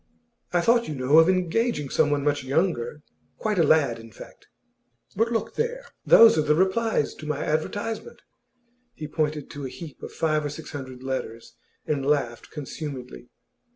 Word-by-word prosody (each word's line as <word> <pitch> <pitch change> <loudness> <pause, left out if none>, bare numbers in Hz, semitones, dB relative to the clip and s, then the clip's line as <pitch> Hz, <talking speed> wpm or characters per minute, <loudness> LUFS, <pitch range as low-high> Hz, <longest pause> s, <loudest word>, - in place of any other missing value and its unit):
'I 175 - +2
thought, 235 +5 +3
you 155 - -4
know, 135 +4 +5
of 165 +2 +5
engaging 185 - 0
someone 145 -2 +2
much 145 -1 0
younger 145 -2 -1 0.3
quite 210 -4 -1
a - - +6
lad, 145 -6 +3
in 115 0 -12
fact. - - -14 0.7
But 225 +4 +1
look 225 - -1
there! 485 +2 -2 0.2
Those 225 -8 +8
are - - +4
the 150 0 +2
replies 190 -1 +1
to 155 - -10
my 150 -1 -2
advertisement.' 205 - -3 0.7
He 155 - -6
pointed 150 -1 -2
to 140 -2 -6
a - - -7
heap 160 +1 -10
of - - -7
five 155 -1 0
or 145 - -2
six 150 +2 -8
hundred 130 -3 -8
letters, 130 -4 -5 0.3
and 145 -3 -1
laughed 135 -5 -1
consumedly. 140 -4 -7
150 Hz, 165 wpm, -25 LUFS, 140-185 Hz, 0.7 s, Those